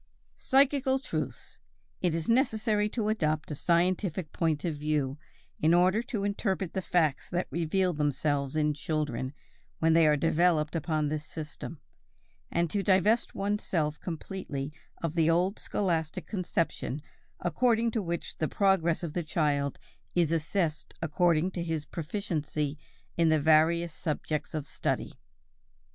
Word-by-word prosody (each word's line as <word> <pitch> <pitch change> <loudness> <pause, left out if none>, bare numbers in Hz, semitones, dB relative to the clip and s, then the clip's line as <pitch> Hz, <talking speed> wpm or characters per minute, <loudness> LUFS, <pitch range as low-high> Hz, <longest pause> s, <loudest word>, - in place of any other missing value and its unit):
=Psychical 270 0 +3
truths=. 270 - -5 0.4
It 175 -3 +1
is 165 -1 -2
necessary 220 -4 +2
to 215 -1 -1
adopt 155 -8 0
a - - -1
scientific 175 +1 +1
point 160 -2 0
of 165 -3 -1
view 145 -2 -1 0.4
in 160 +2 +5
order 185 +5 +4
to 230 -4 -3
interpret 195 -3 -1
the 190 - -1
facts 160 -6 +1
that 180 +1 -1
reveal 180 +2 +1
themselves 145 -1 0
in 150 -1 +2
children 145 -4 -2 0.5
when 160 0 +3
they 165 -1 +6
are 150 -1 +4
developed 165 0 +2
upon 155 -2 0
this 155 0 -2
system, 155 0 -7 0.7
and 170 0 +1
to 205 - +1
divest 200 +4 +3
oneself 185 -7 -1
completely 155 -5 -5 0.3
of 165 -2 -1
the 165 -1 +3
old 180 +4 +2
scholastic 170 -2 -1
conception 170 - -2 0.4
according 230 +6 +2
to 220 - 0
which 170 -2 -4
the 155 - +1
progress 180 -4 +2
of 160 -3 -3
the 175 - 0
child 145 -3 0 0.4
is 170 -3 +3
assessed 165 0 -1
according 170 +2 +2
to 175 - -4
his 160 -3 -2
proficiency 155 -4 -3 0.4
in 165 -1 +4
the 155 -1 +4
various 160 +2 +4
subjects 155 -1 -3
of 150 -2 -2
study. - - -2
165 Hz, 140 wpm, -29 LUFS, 155-190 Hz, 0.7 s, they